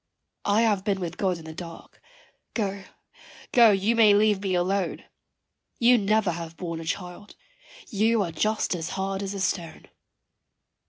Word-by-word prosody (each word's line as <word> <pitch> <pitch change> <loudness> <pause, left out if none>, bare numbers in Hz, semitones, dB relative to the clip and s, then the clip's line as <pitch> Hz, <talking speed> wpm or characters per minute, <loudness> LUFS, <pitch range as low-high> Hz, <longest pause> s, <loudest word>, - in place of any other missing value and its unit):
I 205 +2 +3
have 205 -4 +1
been 200 -2 0
with 175 -2 -4
God 185 -3 0
in 165 - -12
the 160 - -8
dark 165 0 -10 0.5
go, 200 -3 -2 0.7
go, 235 -2 +7
you 205 +3 +2
may 215 -3 +6
leave 210 -1 +3
me 190 -2 -1
alone 185 +1 -1 0.7
You 240 0 +5
never 210 -1 +2
have 165 -1 -7
borne 170 -2 -5
a 165 - -7
child 180 +4 -6 0.5
you 220 0 +2
are 170 - -4
just 215 +7 0
as 170 -2 -4
hard 195 0 -2
as 200 0 -4
a - - -4
stone. 170 -4 -3
195 Hz, 160 wpm, -26 LUFS, 175-210 Hz, 0.7 s, go